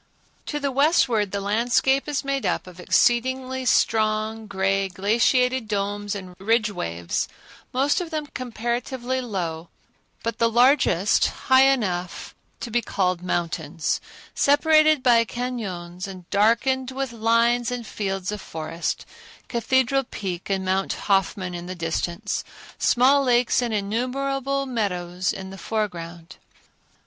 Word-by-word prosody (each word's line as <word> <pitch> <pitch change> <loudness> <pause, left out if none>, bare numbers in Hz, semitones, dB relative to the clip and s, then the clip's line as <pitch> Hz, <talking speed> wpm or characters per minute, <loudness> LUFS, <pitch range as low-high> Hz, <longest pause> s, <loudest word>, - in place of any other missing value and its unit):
To 295 - -2
the 280 -1 -1
westward 260 - +3
the 200 - -2
landscape 235 +7 +1
is 295 -1 -1
made 275 -1 -1
up - - -1
of 180 -1 -13
exceedingly 260 +6 +1
strong, 215 -1 +1
gray, 195 0 0
glaciated 235 +6 +2
domes 205 0 -2
and 185 -2 -8
ridge 215 +1 +2
waves, 85 - -3 0.4
most 280 +7 +1
of 345 - -5
them 310 -2 -3
comparatively 245 0 -3
low, 175 -8 -4 0.5
but 230 - -3
the 230 - +4
largest 235 - +4
high 260 0 +4
enough 185 -9 -2 0.3
to 235 - -5
be 240 +2 +2
called 185 -5 -1
mountains; 170 -2 -2 0.3
separated 310 0 +4
by 235 -2 +5
cañons 200 -7 -5
and 185 -3 -10
darkened 235 +5 +2
with 265 -1 -3
lines 230 +1 +2
and 245 -2 -4
fields 195 -3 -3
of 210 -1 -5
forest, 165 +1 -4 0.4
Cathedral 260 +3 +2
Peak 185 -6 -5
and 190 -1 -1
Mount 190 +1 0
Hoffman 195 -2 0
in 175 0 -6
the 185 - -5
distance; 175 +4 -2 0.4
small 270 +3 +4
lakes 245 -1 +3
and 240 -2 -1
innumerable 270 +6 -1
meadows 185 -6 -2
in 190 0 -7
the 195 - -10
foreground. 175 -5 -4
220 Hz, 130 wpm, -24 LUFS, 190-255 Hz, 0.5 s, by